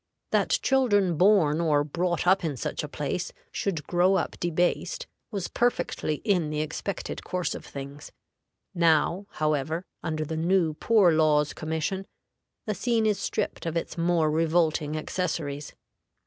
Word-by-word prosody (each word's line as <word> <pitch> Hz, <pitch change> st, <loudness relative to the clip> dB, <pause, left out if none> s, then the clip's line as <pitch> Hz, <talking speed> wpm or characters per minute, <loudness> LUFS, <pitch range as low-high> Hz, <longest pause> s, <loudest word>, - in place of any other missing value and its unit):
That -, -, +3 dB
children 205 Hz, -10 st, +3 dB
born 170 Hz, -4 st, +4 dB
or 150 Hz, -3 st, +3 dB
brought 175 Hz, +4 st, -1 dB
up 190 Hz, +1 st, +4 dB
in 150 Hz, -5 st, -2 dB
such -, -, -3 dB
a -, -, -3 dB
place -, -, -3 dB, 0.2 s
should 165 Hz, -7 st, -2 dB
grow 180 Hz, +2 st, +3 dB
up 185 Hz, -, 0 dB
debased 175 Hz, -, 0 dB, 0.2 s
was 200 Hz, -5 st, -3 dB
perfectly 235 Hz, -10 st, -1 dB
in 180 Hz, -7 st, +2 dB
the 150 Hz, 0 st, -1 dB
expected 165 Hz, +5 st, -4 dB
course 180 Hz, -1 st, -2 dB
of -, -, -7 dB
things. 140 Hz, +1 st, -8 dB, 0.6 s
Now, 170 Hz, +2 st, +2 dB
however, 155 Hz, +3 st, -1 dB, 0.2 s
under 155 Hz, -1 st, -2 dB
the 160 Hz, +1 st, -4 dB
new 170 Hz, -1 st, +2 dB
Poor 200 Hz, +2 st, +4 dB
Laws 155 Hz, -2 st, +3 dB
Commission, 160 Hz, +5 st, -3 dB, 0.6 s
the 215 Hz, -, -1 dB
scene 230 Hz, +1 st, +1 dB
is 210 Hz, -3 st, +2 dB
stripped 200 Hz, -, -2 dB
of 165 Hz, 0 st, -1 dB
its 165 Hz, -, -3 dB
more 170 Hz, -2 st, +2 dB
revolting 155 Hz, -1 st, +1 dB
accessories. 155 Hz, -4 st, -3 dB
170 Hz, 145 wpm, -27 LUFS, 155-190 Hz, 0.6 s, born